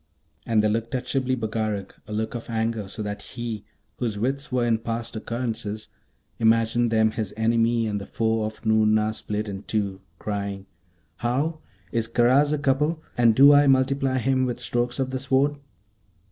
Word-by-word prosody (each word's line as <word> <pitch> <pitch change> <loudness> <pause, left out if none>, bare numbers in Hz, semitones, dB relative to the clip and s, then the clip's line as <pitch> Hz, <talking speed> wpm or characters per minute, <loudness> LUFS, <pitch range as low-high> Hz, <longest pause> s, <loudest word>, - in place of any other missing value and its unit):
And 110 -2 +3
they - - +4
looked 115 +3 -1
at 125 0 -2
Shibli 130 -1 0
Bagarag 110 -4 -2 0.2
a - - -9
look 110 +1 -2
of 120 -1 -6
anger, 110 -2 -1
so 105 +2 -5
that 105 0 -4
he, 115 -4 -6 0.3
whose 115 -4 -2
wits 135 +6 -2
were 125 -1 +1
in 115 -2 +2
past 115 0 -4
occurrences, 110 -2 -4 0.5
imagined 115 +1 +3
them 110 -1 +3
his 105 -2 -4
enemy 115 +1 +2
and 105 -2 -2
the - - -8
foe 110 0 0
of 110 +1 -7
Noorna 110 0 +3
split 105 0 -3
in 100 -1 -5
two, 100 -3 -2 0.2
crying, 100 -1 -4 0.5
'How? 140 +7 -1 0.3
Is 115 -1 0
Karaz 125 +5 +4
a 150 - +1
couple? 150 +3 +1
and 115 -2 +4
do 140 +3 +8
I 145 0 +6
multiply 135 0 +2
him 130 +1 +1
with 125 0 -3
strokes 120 0 -1
of 130 -1 -1
the 130 - -2
Sword?' 140 +2 +1
115 Hz, 175 wpm, -25 LUFS, 110-130 Hz, 0.5 s, do